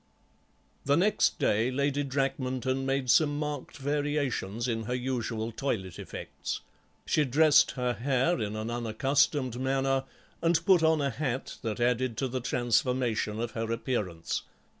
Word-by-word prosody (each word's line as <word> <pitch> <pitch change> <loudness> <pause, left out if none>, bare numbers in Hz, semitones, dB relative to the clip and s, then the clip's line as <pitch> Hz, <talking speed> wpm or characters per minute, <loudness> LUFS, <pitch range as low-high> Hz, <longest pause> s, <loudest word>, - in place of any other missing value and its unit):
The 140 +2 +3
next 205 +5 +3
day 110 +4 +2
Lady 140 +2 0
Drakmanton 135 -1 -1
made 135 -2 +1
some 145 -2 +4
marked 150 -2 -4
variations 140 -6 -1
in 115 -2 -2
her 125 +2 -1
usual 120 -3 -2
toilet 105 -8 -3
effects. - - -6 0.4
She 155 - +2
dressed 150 +3 +5
her 125 -1 -1
hair 135 +5 +1
in 105 0 -2
an 110 +2 -3
unaccustomed 125 +2 +1
manner, 135 0 +1 0.4
and 165 0 +2
put 190 -4 +6
on 160 -1 +3
a 140 -1 0
hat 130 +1 -3
that 110 -3 -3
added 120 -1 +1
to 135 - 0
the 130 0 -3
transformation 120 -2 0
of 120 0 -2
her 115 +1 -3
appearance. 105 -9 -2
130 Hz, 140 wpm, -29 LUFS, 115-140 Hz, 0.4 s, put